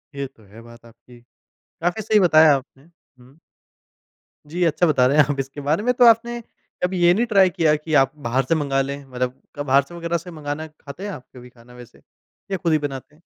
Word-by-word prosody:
ये 140 0 -4
तो 115 - -24
है 105 +3 -15
बात 115 0 -16
आपकी। 120 +1 -18 0.4
काफ़ी 175 +5 -4
सही 215 0 +2
बताया 160 -5 +6
आपने, 135 0 -9 0.4
हुँ। 130 +4 -20 1.1
जी, 175 +4 -2
अच्छा 165 +1 +2
बता 130 -5 +3
रहे 140 +3 +1
हैं 150 - +7
आप 140 - -8
इसके 135 +2 -5
बारे 150 +7 0
में 250 +2 +2
तो 245 0 +4
आपने 235 +1 +3 0.4
कभी 180 0 -1
ये 175 0 +6
नहीं 225 +6 +1
ट्राई 195 -5 +4
किया 160 -3 +2
कि 155 +1 -6
आप 135 -1 0
बाहर 135 -2 -1
से 165 - +1
मँगा 140 -3 0
लें? 140 +1 -5
मतलब 125 0 -4
क 145 - -5
बाहर 140 -1 +3
से 155 +6 -14
वगैरह 170 0 -2
से 175 +2 -11
मँगाना 155 0 -6
खाते 155 +2 -12
हैं 205 - -4
आप 130 -9 -10
कभी 125 0 -12
खाना 120 0 -19
वैसे 125 -1 -15 0.5
या 195 - 0
खुद 170 -2 -1
ही - - +4
बनाते 145 0 -7
हैं? 160 - -26
150 Hz, 225 wpm, -21 LUFS, 130-175 Hz, 1.1 s, हैं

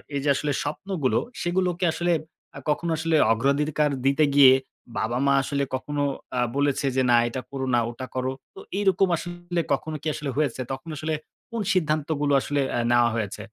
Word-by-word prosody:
এই 140 - 0
যে 145 - +1
আসলে 150 +1 -1
স্বপ্নগুলো, 155 -1 -1 0.2
সেগুলোকে 180 0 0
আসলে 175 0 0 0.5
আ - - -6
কখনো 165 +3 0
আসলে 160 0 +1 0.2
অগ্রাধিকার 145 +5 +1 0.2
দিতে 140 +3 +4
গিয়ে 135 -2 +9 0.4
বাবা-মা 125 +5 +1
আসলে 140 -1 -1
কখনো 145 +2 -2 0.3
আ - - +2 0.2
বলেছে 140 -1 +1
যে, 130 - +3
"না, 120 - +6
এটা 130 +2 -4
করো 135 -1 -3
না, - - +4
ওটা 130 +2 -7
করো।" 130 0 -1 0.2
তো - - -10 0.2
এরকম 190 -1 +3
আসলে 175 0 -3
কখনো 155 +3 -2
কি 160 - -5
আসলে 150 -2 -4
হয়েছে? 140 -4 0
তখন 135 +5 -6
আসলে 155 +1 -2 0.4
কোন 230 -2 -2
সিদ্ধান্তগুলো 155 -3 0
আসলে 145 -1 -1 0.2
আ - - +1
নেওয়া 120 -1 +5
হয়েছে? 105 -1 -3
145 Hz, 175 wpm, -25 LUFS, 135-165 Hz, 0.5 s, গিয়ে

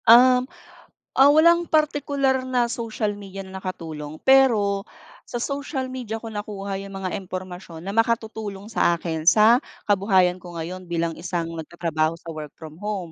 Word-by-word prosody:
Um, 250 +2 +7 0.7
ah, 270 - +9
walang 335 +3 +5
partikular 285 -3 +1
na 245 -2 +1
social 220 -3 -2
media 195 -1 -8
na 190 0 -8
nakatulong, 160 -5 -6
pero 220 -7 +4 0.4
sa 240 0 -3
social 275 -2 -3
media 235 -4 -5
ko 225 - -6
nakuha 200 -2 -5
yung 195 0 -8
mga 185 - -2
impormasyon 185 -3 -8
na 195 - -4
makatutulong 220 -2 -1
sa 175 -5 +3
akin 160 -1 -4
sa 220 +5 +7 0.3
kabuhayan 190 -3 +3
ko 175 -1 -11
ngayon 180 +3 -6
bilang 170 -1 -1
isang 170 -2 -3
nagtatrabaho 165 -1 -2
sa 165 0 -9
work 155 -2 -7
from 155 0 -11
home. 200 -5 -4
200 Hz, 150 wpm, -23 LUFS, 175-240 Hz, 0.7 s, ah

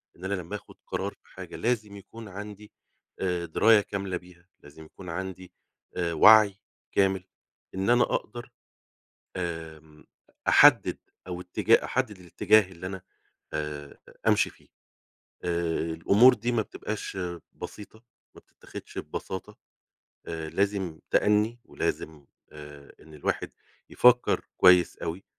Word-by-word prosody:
إن 90 - -10
أنا 100 - -1
لمّا 90 +1 -4
آخد 105 - -11
قرار - - -3
في - - -25
حاجة - - -9
لازم 110 -4 -1
يكون 110 +3 -11
عندي 105 +2 -9 0.5
آآ 90 -2 -1
دراية 105 +6 +5
كاملة 100 -3 -4
بيها 90 0 -17
لازم 80 +2 -14
يكون 90 +3 -12
عندي 95 0 -6 0.4
آآ 85 -2 -1
وعي 105 +3 +7 0.4
كامل، 95 -2 +1 0.5
إن 95 +3 -1
أنا 120 0 +5
أقدر 120 +2 -4 0.9
آمم 80 -3 -7 0.4
أحدد - - +6 0.3
أو 90 -1 -5
اتجاه 90 0 +2
أحدد 105 -3 -2
الاتجاه 95 +2 +3
اللي 90 +1 -8
أنا 95 -1 -6 0.5
آآ 75 -1 -5 0.3
أمشي - - +4
فيه، - - -22 0.8
آآ 85 -1 -1
الأمور 105 +10 +6
دي 120 +1 -2
ما 120 -2 +1
بتبقاش 105 -1 -6 0.4
بسيطة 105 +2 -10 0.3
ما - - -14
بتتخدش - - -12
ببساطة 100 +2 -6 0.7
آآ 80 -1 -5
لازم 95 -4 -1
تأني 105 +3 +2
ولازم 75 -3 -4 0.3
آآ 75 -1 -12
إن 80 0 -16
الواحد 75 - -3 0.4
يفكر 125 0 +4
كويس 90 -1 +6
أوي 85 +4 -5
95 Hz, 125 wpm, -27 LUFS, 85-105 Hz, 0.9 s, وعي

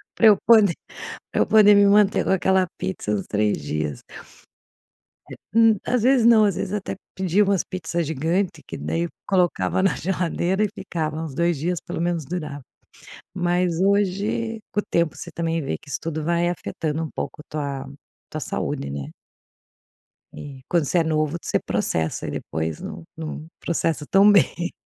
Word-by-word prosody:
Para 225 - +5
eu 210 -2 +7
poder 215 -6 +6 0.6
para - - +1
eu - - +4
poder 210 -1 +6
me 200 0 +6
manter 200 0 +4
com - - 0
aquela 190 0 +3
pizza 95 +2 -3
uns 100 -3 -1
3 105 -5 0
dias. 75 -2 -3 1.3
É - - -8 0.2
Hum, 225 -1 +6
às 250 -3 +1
vezes 250 -1 +4
não. 225 -2 +7
Às 200 -4 +1
vezes 195 +1 -3
até 205 -2 -3 0.2
pedia 190 +2 +2
umas 195 -2 +2
pizzas 175 -3 -3
gigantes, 160 +3 -1
que - - -7
daí 170 +1 -2 0.2
colocava 180 - +1
na 195 - +3
geladeira 180 +2 -1
e - - 0
ficava. 160 -4 -3
Uns 155 -4 -6
2 170 +2 +1
dias, 170 +5 -1
pelo 175 -1 -5
menos, 170 -4 -1
durava. 155 -4 -5 0.7
Mas 175 -1 0
hoje 200 +3 0
com 210 - +1
o - - -11
tempo, 170 -2 +1
você - - -8
também 165 -1 -1
vê 135 - -3
que - - -20
isso - - -2
tudo 160 -1 -3
vai 170 +2 +1
afetando 160 -2 -3
um 160 - -3
pouco - - -5
a - - -12
tua 140 -3 -4 0.4
tua - - -4
saúde, 70 - -3
né? 70 -1 -5 1.3
E 140 -3 -9
quando 170 -4 +1
você 175 - +2
é - - +3
novo, 155 0 0
você - - 0
processa 80 -1 -1
e - - -3
depois 80 0 -4
não - - -7
não 160 -1 -6
processa 165 -2 -1
tão 195 +2 +6
bem. 180 -3 +2
170 Hz, 175 wpm, -23 LUFS, 155-195 Hz, 1.3 s, eu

